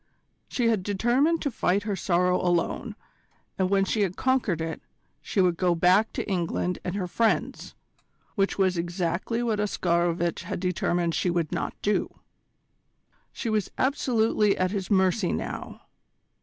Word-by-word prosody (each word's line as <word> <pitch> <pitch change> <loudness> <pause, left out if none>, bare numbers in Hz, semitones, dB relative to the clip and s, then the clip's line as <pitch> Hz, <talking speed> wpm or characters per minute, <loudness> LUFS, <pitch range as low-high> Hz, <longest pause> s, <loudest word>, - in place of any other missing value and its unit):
She 240 -3 0
had 220 -4 +1
determined 240 - +1
to 285 - -1
fight 200 -2 +1
her 205 -2 -2
sorrow 180 -1 +1
alone, 175 -2 -1 0.6
and 185 -1 +2
when 195 0 +3
she 210 +2 0
had 185 -3 -1
conquered 260 -10 +1
it, 160 0 -4 0.4
she - - -3
would 180 -2 +3
go 180 -1 +2
back 185 +6 +4
to - - -3
England 180 -1 -1
and 180 - -3
her 195 -3 -1
friends 225 +5 -1 0.6
which 195 -2 0
was 185 -3 +2
exactly 175 +6 -2
what 220 -3 0
Oscarovitch 175 -4 0
had - - -5
determined 175 -2 0
she 180 - 0
should 170 -3 -1
not - - -3
do. 210 - -1 1.1
She 240 - -5
was 215 -2 0
absolutely 225 -6 +2
at 185 0 +1
his 195 -3 -3
mercy 190 -1 +2
now. - - -5
190 Hz, 150 wpm, -26 LUFS, 175-215 Hz, 1.1 s, back